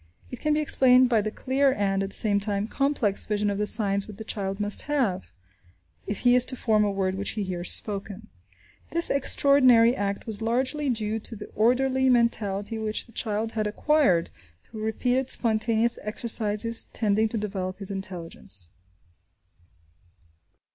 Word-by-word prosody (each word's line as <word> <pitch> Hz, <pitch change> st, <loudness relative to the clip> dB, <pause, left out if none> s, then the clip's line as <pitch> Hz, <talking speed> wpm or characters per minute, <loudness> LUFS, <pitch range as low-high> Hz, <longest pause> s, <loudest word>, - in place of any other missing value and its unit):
It 250 Hz, -, -7 dB
can 305 Hz, 0 st, 0 dB
be 305 Hz, -, +1 dB
explained 255 Hz, -3 st, +4 dB
by 225 Hz, -3 st, +2 dB
the 215 Hz, -, -3 dB
clear 270 Hz, +5 st, 0 dB
and, 195 Hz, -2 st, -1 dB
at 195 Hz, -, -3 dB
the -, -, -5 dB
same 205 Hz, -2 st, +3 dB
time, 200 Hz, 0 st, -2 dB
complex 275 Hz, -7 st, 0 dB
vision 210 Hz, -1 st, -1 dB
of 200 Hz, -, -4 dB
the 210 Hz, -, +1 dB
signs 200 Hz, -2 st, +1 dB
which 210 Hz, -2 st, -11 dB
the 220 Hz, -, -7 dB
child 195 Hz, -2 st, -4 dB
must 205 Hz, 0 st, +1 dB
have, 235 Hz, -11 st, -1 dB, 0.8 s
if 205 Hz, -, -4 dB
he 245 Hz, -1 st, +4 dB
is 250 Hz, -1 st, +7 dB
to -, -, -1 dB
form 220 Hz, -4 st, +1 dB
a 205 Hz, -, +1 dB
word 195 Hz, -1 st, -1 dB
which 200 Hz, +3 st, -4 dB
he 210 Hz, -, -1 dB
hears 180 Hz, -2 st, -2 dB
spoken. 205 Hz, 0 st, -2 dB, 0.6 s
This 335 Hz, 0 st, +1 dB
extraordinary 255 Hz, -4 st, +4 dB
act 200 Hz, 0 st, -3 dB
was 220 Hz, -1 st, -4 dB
largely 260 Hz, +6 st, -1 dB
due 220 Hz, -2 st, -2 dB
to 225 Hz, -, -7 dB
the 210 Hz, 0 st, -10 dB
orderly 260 Hz, +4 st, +2 dB
mentality 220 Hz, -3 st, 0 dB
which 215 Hz, 0 st, -2 dB
the 235 Hz, -, -19 dB
child 220 Hz, 0 st, -2 dB
had 215 Hz, -2 st, -2 dB
acquired 210 Hz, -, +1 dB, 0.3 s
through 220 Hz, -2 st, -10 dB
repeated 250 Hz, +4 st, -1 dB
spontaneous 225 Hz, 0 st, +2 dB
exercises 220 Hz, 0 st, 0 dB
tending 215 Hz, 0 st, +2 dB
to 225 Hz, -, -4 dB
develop 190 Hz, -3 st, -4 dB
his 200 Hz, 0 st, -5 dB
intelligence. 165 Hz, -, -5 dB
215 Hz, 165 wpm, -25 LUFS, 200-245 Hz, 0.8 s, is